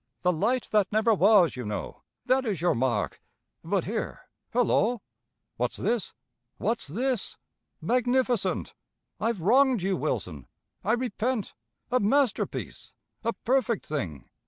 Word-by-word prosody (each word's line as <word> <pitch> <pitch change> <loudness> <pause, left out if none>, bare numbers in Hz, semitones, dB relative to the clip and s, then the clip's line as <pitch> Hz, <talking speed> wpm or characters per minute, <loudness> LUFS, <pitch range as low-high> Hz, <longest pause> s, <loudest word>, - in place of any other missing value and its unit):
'The 180 0 +3
light 225 +9 0
that 210 -3 +3
never 220 +2 +3
was,' 200 -6 +5
you 125 - -5
know, 105 -3 -5 0.2
That 260 +1 +3
is 210 - -2
your 175 +2 +2
mark 120 -3 -1 0.4
but - - 0
here, - - -3 0.3
hullo! 240 -1 +2 0.6
What's - - -1
this? 235 -3 -1 0.4
What's 230 -8 -1
this? 240 - -2 0.4
Magnificent! 245 -4 +1 0.5
I've 220 -3 -1
wronged 250 +2 +4
you, 190 0 +1
Wilson! 90 - -3 0.4
I 220 - +2
repent! 240 -1 -1 0.4
A 255 - +3
masterpiece! 255 +3 0 0.3
A 230 0 0
perfect 245 -3 0
thing! 90 - -4
215 Hz, 125 wpm, -27 LUFS, 175-245 Hz, 0.6 s, was